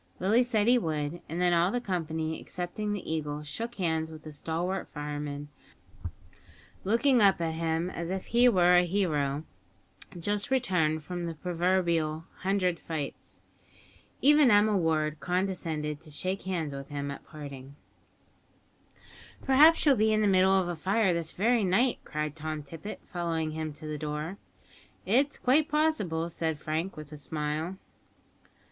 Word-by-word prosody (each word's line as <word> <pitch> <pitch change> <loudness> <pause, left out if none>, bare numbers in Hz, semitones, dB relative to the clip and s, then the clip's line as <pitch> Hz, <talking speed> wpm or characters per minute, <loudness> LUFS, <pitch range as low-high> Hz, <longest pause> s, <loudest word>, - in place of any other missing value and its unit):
Willie 210 +6 +3
said 225 -4 +1
he 245 +1 +5
would, 155 -2 -3
and 165 +3 -3
then 180 -1 +3
all 170 +1 +3
the 245 - -1
company, 160 -6 -3
excepting 180 +4 -4
the 205 -3 -4
Eagle, 150 -1 -3
shook 230 +11 -5
hands 160 -4 -1
with 155 -1 -11
the 155 - -8
stalwart 170 +5 -3
fireman, 145 -1 -5 1.3
looking 235 +5 +3
up 195 -3 +5
at 165 -1 -1
him 165 +1 -1
as 170 -1 -5
if 190 0 -3
he 240 +1 +5
were 180 -4 +5
a - - +7
hero 155 -6 0 0.8
just 205 +6 -1
returned 180 - +1
from 175 +2 -4
the 165 -1 -4
proverbial 170 -2 0
"hundred 185 -2 0
fights." 155 -4 -6 0.8
Even 295 -1 +6
Emma 210 0 +5
Ward 155 -4 +1
condescended 165 -5 -2
to 160 - -13
shake 185 +6 -2
hands 165 -6 -2
with 140 0 -7
him 140 -1 -4
at 140 - -8
parting. 140 -3 -10 1.7
"Perhaps 300 +6 +6
you'll 285 -3 +6
be 220 0 +3
in 215 0 +2
the 210 - +3
middle 190 0 +5
of 185 - -1
a 175 - -2
fire 190 +3 +2
this 170 -1 -2
very 230 +3 +2
night," 215 +7 +2
cried 150 -1 -3
Tom 155 -1 -4
Tippet, 165 +8 -8
following 165 -3 -2
him 155 0 -4
to 150 +1 -10
the 150 -1 -4
door. 150 +5 -4 0.7
"It 250 +9 +4
is 285 - -10
quite 285 +5 +3
possible," 255 - +1
said 160 -2 -1
Frank, 155 +5 -3
with 155 -1 -9
a 150 - -8
smile. 150 +4 -3
170 Hz, 155 wpm, -29 LUFS, 155-200 Hz, 1.7 s, a